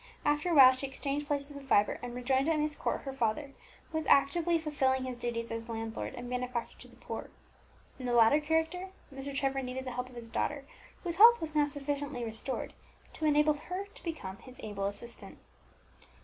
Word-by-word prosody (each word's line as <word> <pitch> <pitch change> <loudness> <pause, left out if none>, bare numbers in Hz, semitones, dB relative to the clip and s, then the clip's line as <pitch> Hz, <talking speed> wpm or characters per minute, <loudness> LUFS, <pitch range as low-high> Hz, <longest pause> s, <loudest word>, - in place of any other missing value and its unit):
After 295 +3 +2
a 340 - +2
while 260 -3 +10
she 260 +2 -3
exchanged 280 +2 -3
places 285 0 -2
with 280 -1 -9
Vibert, 205 -4 +3
and 245 0 -6
rejoined 265 +4 +1
at 320 - +2
Myst 300 0 -1
Court - - -1
her 270 - -5
father, 270 +3 -1 0.4
who 320 - -1
was 310 - -5
actively 335 +5 +4
fulfilling 270 -5 +1
his 255 -1 -4
duties 235 -1 -3
as 230 +1 -5
a - - -3
landlord 225 0 -4
and 245 0 -7
benefactor 250 -1 -3
to - - -12
the - - -18
poor. - - -7 0.7
In 255 - -4
the 245 - 0
latter 235 +5 +6
character 320 +4 0 0.2
Mr. 270 +1 -5
Trevor 270 -1 0
needed 260 +1 -5
the 255 - -4
help 250 +1 -4
of 250 - -15
his 235 -1 -8
daughter, 275 +4 -2 0.4
whose 345 -2 -3
health 470 +3 +9
was 315 -1 -4
now 295 -1 +3
sufficiently 285 -2 -3
restored 225 +4 -4 0.4
to 315 - -3
enable 300 0 +4
her 360 +6 -5
to - - -15
become 205 - -5
his 255 +4 -14
able 205 -2 -3
assistant. 205 +4 -7
270 Hz, 205 wpm, -31 LUFS, 245-300 Hz, 0.7 s, while